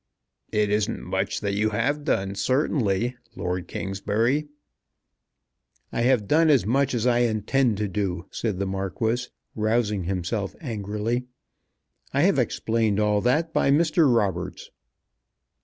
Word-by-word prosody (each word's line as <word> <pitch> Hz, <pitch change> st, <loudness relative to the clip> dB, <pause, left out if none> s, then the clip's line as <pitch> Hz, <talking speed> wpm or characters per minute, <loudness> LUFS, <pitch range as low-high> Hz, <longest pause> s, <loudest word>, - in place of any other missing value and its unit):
"It 105 Hz, -1 st, +1 dB
isn't 105 Hz, 0 st, 0 dB
much -, -, -2 dB
that 100 Hz, -1 st, -1 dB
you 105 Hz, +2 st, +1 dB
have 145 Hz, +8 st, 0 dB
done, 100 Hz, -9 st, 0 dB
certainly, 120 Hz, -2 st, 0 dB, 0.2 s
Lord 90 Hz, 0 st, -3 dB
Kingsbury." 110 Hz, +9 st, -1 dB, 1.4 s
"I -, -, -1 dB
have 120 Hz, -4 st, +2 dB
done 160 Hz, +5 st, +4 dB
as 140 Hz, -8 st, +4 dB
much 135 Hz, +4 st, +1 dB
as 120 Hz, 0 st, -1 dB
I 120 Hz, -1 st, +3 dB
intend 115 Hz, +1 st, +1 dB
to 105 Hz, 0 st, -1 dB
do," 95 Hz, -3 st, -2 dB
said 110 Hz, -5 st, -2 dB
the 100 Hz, -, -1 dB
Marquis, 110 Hz, +6 st, -2 dB, 0.3 s
rousing 110 Hz, -3 st, 0 dB
himself 95 Hz, +2 st, -2 dB
angrily. 110 Hz, -, -3 dB, 0.9 s
"I -, -, +3 dB
have -, -, +3 dB
explained 110 Hz, -2 st, 0 dB
all 105 Hz, -1 st, +2 dB
that 160 Hz, +8 st, +1 dB
by -, -, +2 dB
Mr. 155 Hz, 0 st, +4 dB
Roberts." 95 Hz, -5 st, -1 dB
110 Hz, 130 wpm, -25 LUFS, 100-125 Hz, 1.4 s, done